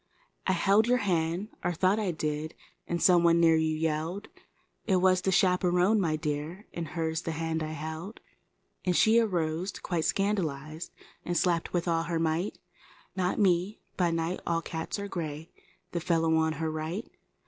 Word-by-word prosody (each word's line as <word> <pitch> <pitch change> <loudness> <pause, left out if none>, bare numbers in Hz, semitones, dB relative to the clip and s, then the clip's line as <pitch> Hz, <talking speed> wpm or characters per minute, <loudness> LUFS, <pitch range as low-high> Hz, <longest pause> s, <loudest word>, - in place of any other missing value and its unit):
I 190 - +3
held 200 +5 +3
your 250 +1 +4
hand, 175 +2 0
or 175 - 0
thought 185 +5 +2
I 210 -3 0
did, 155 -1 -3 0.4
some 175 0 +5
one 170 0 +5
near 165 -1 +5
you 160 0 +1
yelled; 160 +5 -2 0.6
It 195 - +3
was 185 0 +4
the 190 - +1
chaperon, 180 +2 +3
my 160 -4 +1
dear, 155 +5 -4
and 170 -2 -4
h 160 0 -1
the 165 - -3
hand 160 0 -2
I 155 0 -3
held. 160 +7 -6 0.6
And 180 -1 +1
she 220 +5 +5
arose 175 -4 0
quite 170 -4 -2
scandalized, 160 -6 -1 0.3
a 175 - -2
slapped 170 0 +1
with 175 0 -1
all 165 -1 +2
her 170 0 -1
might— 165 +4 -1 0.6
Not 180 -1 0
me—by 185 -1 +1
night 165 +2 -1
all 165 -1 0
cats 160 +3 -4
are 200 0 -4
gray—1 165 0 -7
fellow 165 -1 +2
on 160 0 +2
her 160 +1 -2
right. 160 +7 -4
170 Hz, 160 wpm, -29 LUFS, 160-185 Hz, 0.6 s, some